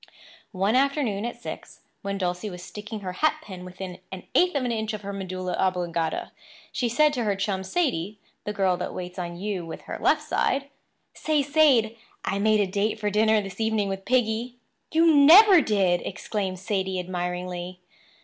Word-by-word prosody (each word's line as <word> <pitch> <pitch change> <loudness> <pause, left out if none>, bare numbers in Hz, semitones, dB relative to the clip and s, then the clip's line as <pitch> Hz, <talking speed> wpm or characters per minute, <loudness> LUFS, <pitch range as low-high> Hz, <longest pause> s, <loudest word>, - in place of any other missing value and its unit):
One 195 +5 +1
afternoon 260 -6 +1
at 240 0 -5
six, - - -9 0.2
when 200 0 -3
Dulcie 180 +2 -2
was 180 -2 -9
sticking 210 +2 -7
her 185 -2 -5
hat 310 +10 +2
pin 185 -6 -9
within 185 0 -8
an 190 -1 -7
eighth 360 -2 +3
of 280 - +1
an 245 - -1
inch 220 -1 -2
of 210 - -5
her 200 0 -5
medulla 185 -2 -4
oblongata, 175 -3 -1 0.4
she 245 - -1
said 300 +5 +3
to 245 - -1
her 205 -2 0
chum, 195 -1 -2
Sadie—the 210 - -3
girl 190 -3 +1
that - - -5
waits 180 0 -6
on 175 -1 -5
you 200 -2 -3
with 165 - -8
her - - -6
left - - +3
side: 275 0 0 0.4
"Say, 305 -2 0
Sade, 275 -7 +3 0.3
I 200 - -1
made 215 0 +3
a - - +2
date 205 +3 -1
for 210 -1 -1
dinner 215 +1 +3
this 195 0 -9
evening 220 -2 +1
with 195 0 -5
Piggy." 240 -1 0 0.4
"You 325 0 +5
never 345 +6 +8
did!" 190 -7 +2
exclaimed 190 -1 -3
Sadie 190 -1 -2
admiringly. 180 0 -4
200 Hz, 180 wpm, -25 LUFS, 185-235 Hz, 0.4 s, never